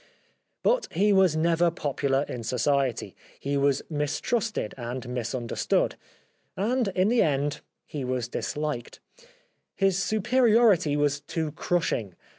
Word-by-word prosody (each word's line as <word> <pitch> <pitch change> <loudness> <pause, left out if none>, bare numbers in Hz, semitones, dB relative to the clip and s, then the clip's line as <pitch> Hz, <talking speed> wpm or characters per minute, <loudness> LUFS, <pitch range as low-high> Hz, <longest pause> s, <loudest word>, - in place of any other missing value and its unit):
But - - +2
he 200 +4 +2
was 190 -5 +4
never 170 +2 +3
popular 140 -4 0
in 125 - -5
society; 130 +1 0 0.2
he 140 +1 -2
was 140 -1 +2
mistrusted 155 - -1
and 125 +1 -5
mis 125 0 -3
understood; 120 -2 0 0.6
andintheendhe 195 - +1 0.3
wasdishked. 130 0 -3 0.8
His 195 -1 +2
superiority 220 - +3
was 145 -1 +1
too 160 +1 -3
crushing. 120 - -1
150 Hz, 95 wpm, -27 LUFS, 135-190 Hz, 0.8 s, was